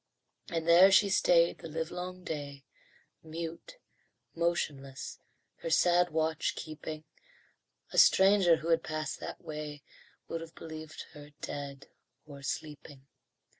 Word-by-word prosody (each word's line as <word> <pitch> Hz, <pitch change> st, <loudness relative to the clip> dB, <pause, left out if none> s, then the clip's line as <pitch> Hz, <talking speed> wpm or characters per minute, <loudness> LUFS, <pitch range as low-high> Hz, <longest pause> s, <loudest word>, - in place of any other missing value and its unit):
And 165 Hz, -3 st, -2 dB
there 180 Hz, +3 st, +8 dB
she 200 Hz, +1 st, +5 dB
stayed 170 Hz, -2 st, +4 dB
the 165 Hz, -, -8 dB
livelong 180 Hz, +3 st, -5 dB
day, 140 Hz, -4 st, -6 dB, 0.6 s
Mute, 165 Hz, -, -7 dB, 0.6 s
motionless, 145 Hz, -5 st, -2 dB, 0.4 s
her -, -, -5 dB
sad 175 Hz, -, +4 dB
watch 160 Hz, 0 st, 0 dB
keeping; 155 Hz, 0 st, -7 dB, 0.9 s
A -, -, +4 dB
stranger 190 Hz, -3 st, +6 dB
who 160 Hz, +1 st, -5 dB
had 165 Hz, -1 st, +4 dB
passed 155 Hz, 0 st, -4 dB
that -, -, -7 dB
way 150 Hz, -2 st, -6 dB, 0.4 s
Would 165 Hz, -, -4 dB
have 165 Hz, 0 st, -10 dB
believed 160 Hz, -1 st, -8 dB
her 150 Hz, 0 st, -12 dB
dead 140 Hz, -1 st, -6 dB, 0.4 s
or 140 Hz, -2 st, -11 dB
sleeping. 145 Hz, -1 st, -6 dB
160 Hz, 120 wpm, -31 LUFS, 150-175 Hz, 0.9 s, there